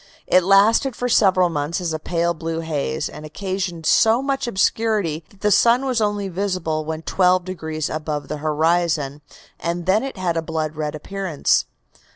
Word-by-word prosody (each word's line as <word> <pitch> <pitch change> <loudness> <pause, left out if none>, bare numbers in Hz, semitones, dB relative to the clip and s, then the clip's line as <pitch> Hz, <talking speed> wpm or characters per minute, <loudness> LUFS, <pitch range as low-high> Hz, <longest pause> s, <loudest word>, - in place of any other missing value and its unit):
It 185 - +4
lasted 215 +7 +4
for 245 - -2
several 190 -6 +4
months 150 +2 -2
as 170 -3 -2
a 155 - -3
pale 170 +1 0
blue 165 0 -4
haze, 145 - -2
and - - -10
occasioned 180 +1 -4
so 225 +9 +4
much 275 -2 -1
obscurity 200 -6 0
that 200 - -23
the 210 - +2
sun 235 +6 +4
was 250 -4 0
only 205 -1 0
visible 180 -4 -2
when 160 +1 -4
twelve 180 +1 +2
degrees 160 -4 -4
above 155 -1 -4
the 150 - -4
horizon, 155 -1 0 0.4
and 170 +1 -3
then 195 +4 +3
it 270 -4 -6
had 175 -3 -1
a - - +1
blood 160 -1 -3
red 150 0 -3
appearance. 185 -1 0
175 Hz, 175 wpm, -21 LUFS, 155-200 Hz, 0.4 s, It